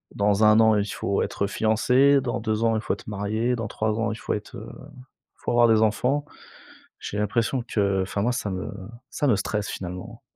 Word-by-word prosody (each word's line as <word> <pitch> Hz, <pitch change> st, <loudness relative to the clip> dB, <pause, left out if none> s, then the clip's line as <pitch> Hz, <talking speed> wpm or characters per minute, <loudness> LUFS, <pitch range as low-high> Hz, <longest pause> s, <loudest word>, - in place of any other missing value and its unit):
dans 105 Hz, +1 st, +2 dB
1 110 Hz, +1 st, +6 dB
an, 110 Hz, -1 st, +5 dB
il 100 Hz, -, +1 dB
faut 100 Hz, -1 st, -2 dB
être 100 Hz, -, -2 dB
fiancés, 125 Hz, +7 st, +3 dB
dans -, -, -2 dB
2 110 Hz, 0 st, -1 dB
ans, 115 Hz, -1 st, +3 dB
il 110 Hz, -, -1 dB
faut -, -, -1 dB
être -, -, -9 dB
mariés, 110 Hz, +4 st, -1 dB
dans 115 Hz, -2 st, -4 dB
3 110 Hz, +1 st, -2 dB
ans 115 Hz, -1 st, 0 dB
il -, -, -4 dB
faut -, -, -3 dB
être, 105 Hz, -, -6 dB
heu, -, -, -9 dB
il 125 Hz, -, -14 dB, 0.3 s
faut -, -, -4 dB
avoir 120 Hz, 0 st, +5 dB
des 110 Hz, -1 st, +4 dB
enfants. 125 Hz, +7 st, +1 dB, 0.8 s
J'ai 105 Hz, -, -5 dB
l'impression 115 Hz, +4 st, 0 dB
que 100 Hz, -2 st, +1 dB
enfin 100 Hz, +1 st, -3 dB
moi 120 Hz, +4 st, +1 dB
ça 120 Hz, -4 st, -3 dB
me 95 Hz, -1 st, -4 dB, 0.4 s
ça 145 Hz, -, -1 dB
me 120 Hz, -, +4 dB
stresse 105 Hz, +1 st, -2 dB
finalement. 90 Hz, 0 st, -7 dB
110 Hz, 215 wpm, -24 LUFS, 100-115 Hz, 0.8 s, 1